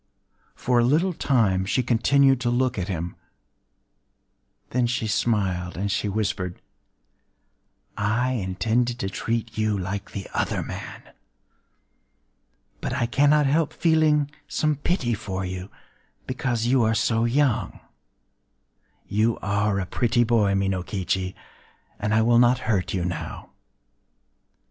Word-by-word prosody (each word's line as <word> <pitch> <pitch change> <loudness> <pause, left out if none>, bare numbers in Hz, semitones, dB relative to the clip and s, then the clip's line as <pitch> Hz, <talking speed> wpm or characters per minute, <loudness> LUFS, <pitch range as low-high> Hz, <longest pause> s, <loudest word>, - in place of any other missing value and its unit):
For 125 -1 +1
a - - +4
little 160 +9 +2
time 110 - +2
she 115 +6 0
continued 135 +2 +3
to 120 - 0
look 125 -1 +1
at 90 - -3
him;—then 90 - -8
she 125 -1 -1
smiled, 95 -5 0
and 100 +2 -1
she 100 +1 -1
whispered:—“I 105 - -5
intended 115 +3 0
to 95 -4 -3
treat 115 +2 -3
you 110 -1 +1
like 100 +1 -4
the 100 -2 -6
other - - -1
man. - - -8 1.8
But - - -3
I 130 -2 0
cannot 145 +4 +3
help 150 +3 +1
feeling 155 -3 +2 0.2
some 155 -1 0
pity 140 -4 -1
for 95 -2 -4
you,—because 115 - -5
you 125 +1 +3
are 110 0 +2
so 115 +1 +1
young... 130 0 +1 1.3
You 110 +3 +1
are 100 0 +1
a 95 - -2
pretty 120 +4 +1
boy, 110 -4 +2
Minokichi; 95 -1 -1 0.6
and 105 0 -1
I 110 +1 +4
will 120 +1 +4
not 120 +1 +5
hurt 100 -5 0
you 90 -2 -1
now. 90 -1 -5
110 Hz, 120 wpm, -24 LUFS, 95-125 Hz, 1.8 s, not